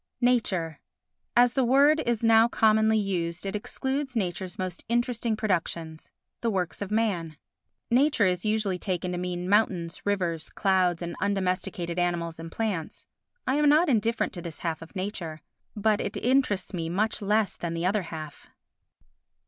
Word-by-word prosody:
Nature 190 Hz, -10 st, +1 dB, 0.6 s
As 245 Hz, 0 st, +6 dB
the 265 Hz, -, +2 dB
word 280 Hz, +5 st, +5 dB
is 235 Hz, -1 st, 0 dB
now 225 Hz, 0 st, +6 dB
commonly 220 Hz, -1 st, +3 dB
used 180 Hz, -4 st, -2 dB
it 195 Hz, +1 st, -3 dB
excludes 265 Hz, +5 st, -3 dB
nature's 185 Hz, -2 st, -2 dB
most 185 Hz, -2 st, -4 dB
interesting 235 Hz, -1 st, 0 dB
productions—the 170 Hz, +1 st, -3 dB
works 180 Hz, -6 st, -2 dB
of 200 Hz, -, -3 dB
man. 190 Hz, -8 st, -1 dB, 0.5 s
Nature 265 Hz, -2 st, +4 dB
is 180 Hz, -1 st, 0 dB
usually 215 Hz, -4 st, 0 dB
taken 180 Hz, -1 st, -2 dB
to 180 Hz, -, -3 dB
mean 180 Hz, 0 st, -3 dB
mountains, 185 Hz, -5 st, +1 dB
rivers, 180 Hz, -5 st, -1 dB
clouds 185 Hz, -3 st, +1 dB
and 170 Hz, 0 st, -4 dB
undomesticated 185 Hz, -2 st, -1 dB
animals 170 Hz, -2 st, -1 dB
and 165 Hz, 0 st, -7 dB
plants. 200 Hz, -7 st, -3 dB, 0.4 s
I 265 Hz, -, +1 dB
am 300 Hz, -1 st, +4 dB
not 310 Hz, +3 st, +5 dB
indifferent 230 Hz, -1 st, +1 dB
to 175 Hz, -, -6 dB
this 170 Hz, -2 st, -7 dB
half 165 Hz, -2 st, -2 dB
of 165 Hz, +5 st, -12 dB
nature, 180 Hz, -5 st, -5 dB, 0.3 s
but 215 Hz, 0 st, +2 dB
it -, -, -3 dB
interests 245 Hz, -8 st, +1 dB
me 165 Hz, -2 st, -3 dB
much 215 Hz, +6 st, 0 dB
less 210 Hz, -1 st, +1 dB
than 170 Hz, -1 st, -4 dB
the 165 Hz, +1 st, -2 dB
other 200 Hz, +3 st, +2 dB
half. 155 Hz, -4 st, -8 dB
195 Hz, 155 wpm, -27 LUFS, 175-225 Hz, 0.6 s, As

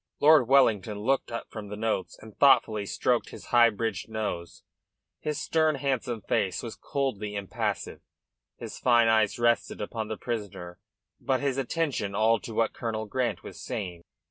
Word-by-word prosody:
Lord 150 Hz, -4 st, +6 dB
Wellington 110 Hz, -6 st, +3 dB
looked 135 Hz, +4 st, 0 dB
up 115 Hz, -, -6 dB
from 110 Hz, -2 st, -7 dB
the 105 Hz, -, -6 dB
notes 110 Hz, -3 st, -2 dB
and 110 Hz, -1 st, -13 dB
thoughtfully 110 Hz, -7 st, +4 dB
stroked -, -, 0 dB
his -, -, -11 dB
high 120 Hz, -1 st, +7 dB
bridged 110 Hz, -2 st, -3 dB
nose. 105 Hz, -6 st, -4 dB, 0.6 s
His 150 Hz, -1 st, -3 dB
stern, 160 Hz, -2 st, +2 dB
handsome 130 Hz, -4 st, -2 dB
face 95 Hz, +1 st, 0 dB
was 115 Hz, -, -6 dB
coldly 110 Hz, -7 st, -3 dB
impassive, 100 Hz, -2 st, -3 dB, 0.6 s
his -, -, -8 dB
fine 120 Hz, -2 st, +4 dB
eyes 110 Hz, -2 st, +3 dB
resting 120 Hz, 0 st, +1 dB
upon 110 Hz, +1 st, -4 dB
the 110 Hz, -1 st, -4 dB
prisoner, 100 Hz, -7 st, -5 dB, 0.4 s
but 130 Hz, -1 st, 0 dB
his 135 Hz, -2 st, 0 dB
attention 135 Hz, -8 st, -1 dB
all 110 Hz, +2 st, +3 dB
to 110 Hz, +2 st, -8 dB
what 115 Hz, 0 st, +1 dB
Colonel 110 Hz, -2 st, -3 dB
Grant 120 Hz, +3 st, -2 dB
was -, -, -9 dB
saying. 90 Hz, -4 st, -5 dB
115 Hz, 160 wpm, -28 LUFS, 105-130 Hz, 0.6 s, high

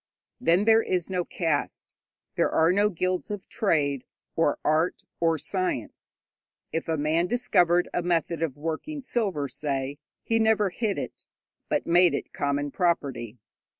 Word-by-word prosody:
Then 175 Hz, +5 st, +3 dB
there 225 Hz, 0 st, +6 dB
is 185 Hz, -3 st, -2 dB
no 180 Hz, -1 st, 0 dB
caste; 165 Hz, -4 st, -2 dB, 0.4 s
there -, -, +2 dB
are 160 Hz, +2 st, +3 dB
no 205 Hz, +3 st, +3 dB
guilds 185 Hz, +1 st, -2 dB
of 205 Hz, -2 st, -5 dB
trade, 145 Hz, -, 0 dB, 0.3 s
or 160 Hz, -3 st, +2 dB
art, 155 Hz, +3 st, +1 dB, 0.2 s
or 165 Hz, -1 st, +2 dB
science. 185 Hz, -, -3 dB, 0.6 s
If 165 Hz, -, -3 dB
a 160 Hz, -1 st, 0 dB
man 155 Hz, +4 st, +1 dB
discovered 180 Hz, -7 st, +3 dB
a -, -, +1 dB
method 170 Hz, -1 st, 0 dB
of 155 Hz, -5 st, -2 dB
working 165 Hz, -, -4 dB
silver, 200 Hz, -, -1 dB
say, 140 Hz, 0 st, -3 dB, 0.2 s
he 225 Hz, 0 st, +1 dB
never 220 Hz, -3 st, +3 dB
hid 210 Hz, +1 st, -1 dB
it, -, -, -6 dB, 0.4 s
but -, -, 0 dB
made 175 Hz, +1 st, +5 dB
it -, -, -5 dB
common 145 Hz, 0 st, -1 dB
property. 135 Hz, -, -1 dB
170 Hz, 150 wpm, -26 LUFS, 150-190 Hz, 0.6 s, there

